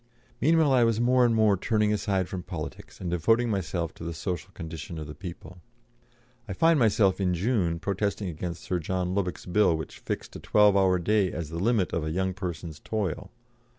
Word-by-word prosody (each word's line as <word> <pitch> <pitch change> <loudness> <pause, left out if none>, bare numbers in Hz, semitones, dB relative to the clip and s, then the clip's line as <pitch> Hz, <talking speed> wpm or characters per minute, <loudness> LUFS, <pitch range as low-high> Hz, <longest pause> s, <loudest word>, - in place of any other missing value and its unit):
Meanwhile 160 0 +4
I 125 -2 +5
was 115 -1 +2
more 125 +1 +4
and 115 -1 +2
more 110 -2 +4
turning 105 +2 +1
aside 95 -3 0
from 95 - -5
politics - - -7
and 90 -2 -4
devoting 115 +8 +2
myself 85 -4 -2
to - - -11
the 85 0 -4
social 85 -3 -4
condition 80 0 -7
of 75 - -5
the 75 - -8
people 90 +1 -9 0.9
I 100 - -4
find 165 - +4
myself, 100 -4 +3
in 90 -2 +1
June, 90 -4 0
protesting 100 +2 -2
against 85 +1 -5
Sir 90 - -1
John 90 +2 -2
Lubbock's 90 -5 -2
Bill 90 -2 +3
which 80 - -8
fixed - - -5
a - - -6
twelve 105 -1 +4
hour 95 -2 +4
day 100 +2 +1
as 85 -3 -5
the 85 +1 -5
limit 105 -1 +1
of 85 - 0
a 80 - -2
"young 95 +3 -1
person's" 85 -4 -6
toil. 100 -3 -3
95 Hz, 195 wpm, -27 LUFS, 85-105 Hz, 0.9 s, I